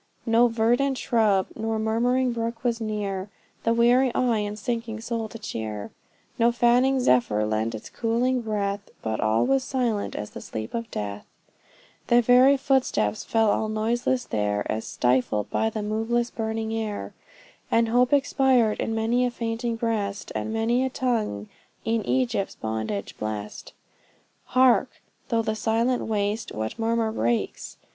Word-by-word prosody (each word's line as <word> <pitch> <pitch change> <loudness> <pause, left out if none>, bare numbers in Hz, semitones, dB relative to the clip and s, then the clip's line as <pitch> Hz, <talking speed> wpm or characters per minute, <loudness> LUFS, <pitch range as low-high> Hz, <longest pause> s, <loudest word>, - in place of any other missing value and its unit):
No 230 +1 +5
verdant 240 +4 +1
shrub, 210 -7 +2
nor 225 0 -2
murmuring 245 +4 +1
brook 230 0 -4
was 235 -2 0
near, 205 -3 -3 0.3
The 230 - +2
weary 240 +2 +4
eye 240 -3 +2
and 210 0 -3
sinking 230 0 -3
soul 225 -1 -3
to 230 - -8
cheer; 110 - -5 0.5
No 235 +1 +5
fanning 245 +3 +3
zephyr 120 - +2
lent 110 +1 -1
its 110 - -9
cooling 245 +2 0
breath, 205 -2 -2
But 110 -1 -2
all 110 +1 +2
was 270 0 +2
silent 240 -6 -1
as 105 - -5
the - - -8
sleep 110 0 -6
of 230 -1 -3
death; 100 0 -5 0.8
Their 240 0 +5
very 255 +4 +6
footsteps 260 - +1
fell 225 -2 +2
all 215 - 0
noiseless 240 +3 0
there 105 -1 -1
As 110 +1 -3
stifled 125 -4 0
by 220 - +1
the 215 -1 -4
moveless, 225 +3 -1
burning 220 0 -3
air; 220 -2 -4 0.6
And 230 0 +3
hope 245 +2 +3
expired 265 -5 +3
in 225 - -1
many 230 +3 +1
a - - -1
fainting 230 0 -3
breast, 215 -3 -2
And 220 - -3
many 225 +3 +1
a 265 - 0
tongue 225 - -1 0.4
e'en 225 0 +1
Egypt's 235 -6 0
bondage 110 -3 -4
blest. 105 -1 -5 0.7
Hark! 255 -1 +4 0.4
through 230 -1 +1
the 220 -1 -1
silent 230 +3 0
waste, 210 0 -1
what 110 - -4
murmur 225 0 +1
breaks? 120 - -2
225 Hz, 150 wpm, -25 LUFS, 200-240 Hz, 0.8 s, very